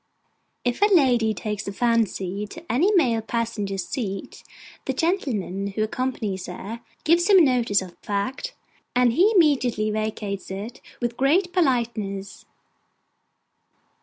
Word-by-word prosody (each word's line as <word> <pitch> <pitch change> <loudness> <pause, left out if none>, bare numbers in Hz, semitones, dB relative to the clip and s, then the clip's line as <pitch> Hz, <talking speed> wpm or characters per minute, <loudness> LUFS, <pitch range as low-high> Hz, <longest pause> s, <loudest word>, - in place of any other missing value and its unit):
If 245 +8 -1
a 415 - +7
lady 250 - +4
take 210 -2 -4
a - - -2
fancy 210 -3 0
to 325 +9 -8
any 340 +12 +3
male 240 -10 +3
passenger's 215 -5 -2
seat, 195 -6 -5 0.4
the 265 - -1
gentleman 245 - -1
who 200 +2 -1
accompanies 215 -5 -3
her 205 +6 -7 0.2
gives 345 +4 +3
him 380 -5 +8
notice 235 -7 +2
of 185 - -10
the - - -27
fact, 205 +6 -3 0.4
and 245 -1 +4
he 375 - +4
immediately 255 - +3
vacates 210 -2 -3
it 200 +5 -6 0.2
with 240 0 -2
great 350 +7 +2
politeness. 230 - -1
230 Hz, 130 wpm, -24 LUFS, 200-270 Hz, 0.4 s, him